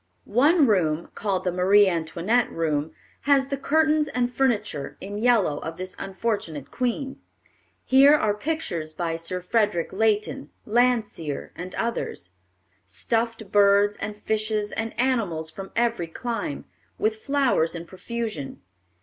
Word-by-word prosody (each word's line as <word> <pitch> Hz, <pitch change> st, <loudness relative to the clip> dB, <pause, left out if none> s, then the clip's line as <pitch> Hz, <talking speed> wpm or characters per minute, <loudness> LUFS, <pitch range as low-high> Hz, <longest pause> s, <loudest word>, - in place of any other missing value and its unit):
One 290 Hz, -, +4 dB
room, 170 Hz, -8 st, +1 dB
called 195 Hz, -3 st, -1 dB
the 180 Hz, -, 0 dB
Marie 195 Hz, +3 st, +5 dB
Antoinette 175 Hz, +7 st, 0 dB
room, 155 Hz, -2 st, -1 dB, 0.4 s
has 275 Hz, -1 st, +4 dB
the 275 Hz, -, 0 dB
curtains 305 Hz, +2 st, +2 dB
and 250 Hz, -3 st, -1 dB
furniture, 210 Hz, -, -1 dB
in 205 Hz, +2 st, -6 dB
yellow, 215 Hz, -11 st, +3 dB
of 165 Hz, +1 st, -6 dB
this 185 Hz, 0 st, -6 dB
unfortunate 190 Hz, -, -3 dB
queen. 255 Hz, +2 st, -2 dB, 0.6 s
Here 275 Hz, +3 st, +7 dB
are 215 Hz, -8 st, +2 dB
pictures 205 Hz, -, -3 dB
by 170 Hz, -2 st, -2 dB
Sir 165 Hz, +2 st, -4 dB
Frederick 195 Hz, -3 st, 0 dB
Leighton, 215 Hz, +5 st, 0 dB, 0.2 s
Landseer, 220 Hz, -, 0 dB
and 180 Hz, +1 st, -7 dB
others; 230 Hz, -, -3 dB, 0.6 s
stuffed 225 Hz, -, -2 dB
birds 205 Hz, 0 st, +5 dB
and 210 Hz, 0 st, -5 dB
fishes 215 Hz, -1 st, -1 dB
and 225 Hz, +1 st, -4 dB
animals 200 Hz, -12 st, 0 dB
from 195 Hz, +3 st, -8 dB
every 235 Hz, -7 st, +1 dB
clime, 230 Hz, -, -4 dB, 0.3 s
with 215 Hz, 0 st, 0 dB
flowers 265 Hz, -, +1 dB
in 170 Hz, 0 st, -6 dB
profusion. 210 Hz, -, -5 dB
210 Hz, 130 wpm, -25 LUFS, 170-240 Hz, 0.6 s, Here